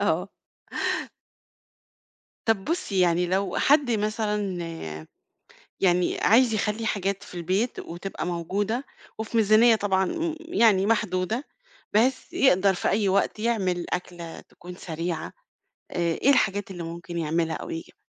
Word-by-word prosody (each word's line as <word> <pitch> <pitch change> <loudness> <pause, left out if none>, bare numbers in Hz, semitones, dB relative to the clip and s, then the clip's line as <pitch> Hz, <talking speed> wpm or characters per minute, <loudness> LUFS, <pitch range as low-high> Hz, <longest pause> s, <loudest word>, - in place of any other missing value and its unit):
آه. 180 -1 +1 2.2
طب 220 -4 +1
بُصّي 315 - -1
يعني 175 0 +3
لو 190 +1 0
حد 285 -3 +4
مثلًا 210 -3 -1 1.2
يعني 180 -1 +2
عايز 235 +1 +5
يخلِّي 215 +1 -1
حاجات 200 -2 -1
في - - -13
البيت 185 +8 -1
وتبقى 175 +3 -6
موجودة، 200 +8 -2 0.3
وفي 220 +1 -3
ميزانية 225 +2 +6
طبعًا 190 -2 +1
م 330 - -2
يعني 230 - +3
محدودة 215 +2 0 0.5
بحيث 250 +5 +2
يقدر 195 -5 +4
في - - -1
أي 205 -1 +2
وقت 200 +2 +1
يعمل 190 -6 0
أكلة 175 -2 -5
تكون 180 +1 -12
سريعة 165 -1 -4 0.6
آآ، - - -7 0.2
إيه 275 - +3
الحاجات 205 -6 +2
اللي 175 -2 -6
ممكن 170 +1 -6
يعملها 165 +1 0
أو - - -7
يجيبها؟ 165 - -7
195 Hz, 125 wpm, -26 LUFS, 180-225 Hz, 2.2 s, ميزانية